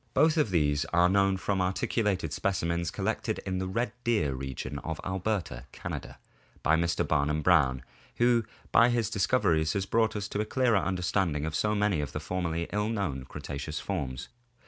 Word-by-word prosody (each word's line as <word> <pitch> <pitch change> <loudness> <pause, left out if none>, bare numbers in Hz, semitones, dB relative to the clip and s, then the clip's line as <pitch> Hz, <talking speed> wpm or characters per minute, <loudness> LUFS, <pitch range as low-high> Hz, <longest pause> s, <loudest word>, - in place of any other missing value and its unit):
Both 155 +3 +5
of 150 -8 +2
these 75 -4 +2
are 85 +1 +3
known 95 0 +3
from 95 0 -1
articu 95 +5 0
lated 95 -7 0
specimens 85 0 -1
collected - - -2
in 95 -1 -2
the 95 - -2
Red 115 +6 -1
Deer 105 - +1
region 65 +2 -5
of 80 +1 -5
Alberta, 95 - -2
Canada, - - -6 0.5
by 80 - +4
Mr. 85 +1 0
Barnum 75 0 +1
Brown, 65 -8 +3 0.3
who 120 -1 +3 0.3
by 115 +2 +6
his 115 -3 0
discoveries 95 -7 +2
has 100 -1 -1
brought 110 +2 +1
us 105 -1 -3
to 105 - -1
a - - +1
clearer 120 -1 +2
understanding 90 -5 0
of 80 - -3
so 105 +6 +1
many 105 -6 +1
of 75 - -5
the - - -2
formerly 85 0 -2
ill 105 +1 0
known 90 - -2
Cre - - -10
taceous 75 +1 -5
forms. 65 -2 -4
90 Hz, 180 wpm, -29 LUFS, 75-105 Hz, 0.5 s, by